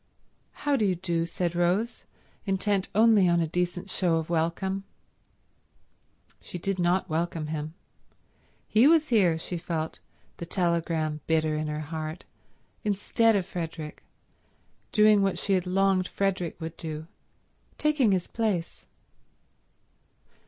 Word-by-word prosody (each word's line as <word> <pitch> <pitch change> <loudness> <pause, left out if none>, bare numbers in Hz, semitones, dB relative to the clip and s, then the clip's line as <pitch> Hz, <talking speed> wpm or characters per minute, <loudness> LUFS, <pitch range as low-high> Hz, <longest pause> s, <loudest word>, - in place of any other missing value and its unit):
"How 290 -1 +3
do 235 - +1
you 190 -3 +2
do," 170 -1 -1
said 175 0 -2
Rose, 180 +7 0 0.4
intent 195 0 0
only 215 -4 +5
on 170 0 +3
a 165 - +2
decent 175 +3 -2
show 175 -3 +1
of 160 +1 -2
welcome. 175 +4 0 1.6
She - - -7
did 190 +2 -2
not 180 +2 +2
welcome 165 -1 -2
him. 155 +1 -4 0.9
He 225 +5 +5
was 315 -1 +4
here, 190 -9 +4
she 170 +1 -5
felt, 160 -2 -3 0.4
the 170 - -6
telegram 165 -4 0
bitter 155 -1 +2
in 155 0 -2
her 150 0 -3
heart, 155 +1 -5 0.6
instead 215 +2 +2
of 190 -3 +1
Frederick, 165 -4 -6 0.9
doing 210 -1 +5
what 195 -1 +1
she 200 - 0
had 185 -1 +1
longed 190 0 +2
Frederick 190 -4 -1
would 160 0 -6
do, 155 -1 -5 0.7
taking 300 -8 +3
his 185 -2 +1
place. 210 -7 -2
175 Hz, 130 wpm, -27 LUFS, 165-195 Hz, 1.6 s, only